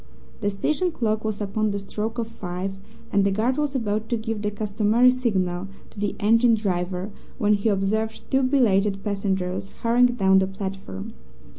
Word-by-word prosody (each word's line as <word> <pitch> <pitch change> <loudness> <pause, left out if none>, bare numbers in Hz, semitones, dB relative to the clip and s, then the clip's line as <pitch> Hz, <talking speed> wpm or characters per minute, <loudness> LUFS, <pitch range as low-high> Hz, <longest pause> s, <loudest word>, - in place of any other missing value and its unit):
The 205 - 0
station 305 - 0
clock 220 -6 -1
was 215 -2 -2
upon 215 +1 0
the 200 - -2
stroke 210 +3 -4
of 230 -2 -1
five, 190 -3 -5 0.4
and 200 0 +3
the 200 - +3
guard 220 +6 +1
was 295 -2 -1
about 220 -3 -1
to 235 - +1
give 220 -1 -3
the 210 - 0
customary 215 +4 +3
signal 190 -7 -1 0.2
to - - -11
the 205 -1 -1
engine 230 +3 +4
driver 185 -1 -2 0.3
when 210 0 +3
he 205 +2 +1
observed 215 +3 0
two 265 0 +4
belated 210 -7 +2
passengers 195 -2 -2
hurrying 240 +2 +5
down 190 -6 +3
the 190 - +1
platform. 190 - -6
210 Hz, 170 wpm, -24 LUFS, 195-230 Hz, 0.4 s, hurrying